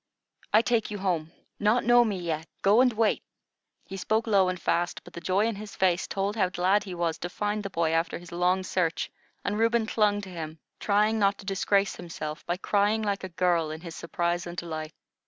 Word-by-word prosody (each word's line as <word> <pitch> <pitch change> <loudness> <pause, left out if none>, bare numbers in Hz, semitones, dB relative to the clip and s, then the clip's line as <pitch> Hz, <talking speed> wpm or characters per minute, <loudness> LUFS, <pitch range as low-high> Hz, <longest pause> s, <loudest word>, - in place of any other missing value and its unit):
"I 215 +2 +5
take 235 -3 +1
you 210 - -4
home. 175 -5 -1 0.3
Not 215 +4 +3
know 240 0 +6
me 210 -4 -1
yet. 165 -2 -3 0.2
Go 205 +5 +6
and 255 -1 +4
wait." 220 -1 +1 0.6
He 195 - -7
spoke 220 +4 0
low 195 -4 +4
and 185 -1 -3
fast; 175 +1 -1
but - - -14
the 170 - -7
joy 190 +5 +2
in 225 -3 -1
his 210 0 -8
face 180 -2 +2
told 200 +2 -1
how 190 -5 +2
glad 190 +3 +2
he 185 -3 -6
was 170 -2 -1
to 175 - -4
find 210 +3 -2
the 200 - -5
boy 165 -3 0
after 165 +1 0
his 175 0 -12
long 180 +2 +1
search, 180 -3 -1 0.3
and 205 +1 -1
Reuben 230 0 +3
clung 210 -2 +2
to 195 - -9
him, 160 -3 -6 0.2
trying 210 +2 +2
not 200 -1 +3
to - - -12
disgrace 195 +1 +1
himself 155 -3 -6
by 175 +1 0
crying 205 +3 +1
like 200 -2 -1
a 190 - -4
girl, 170 -2 +1
in 155 +1 -6
his 165 -2 -8
surprise 175 0 -2
and 175 0 -7
delight. 155 -2 -4
190 Hz, 215 wpm, -27 LUFS, 170-210 Hz, 0.6 s, know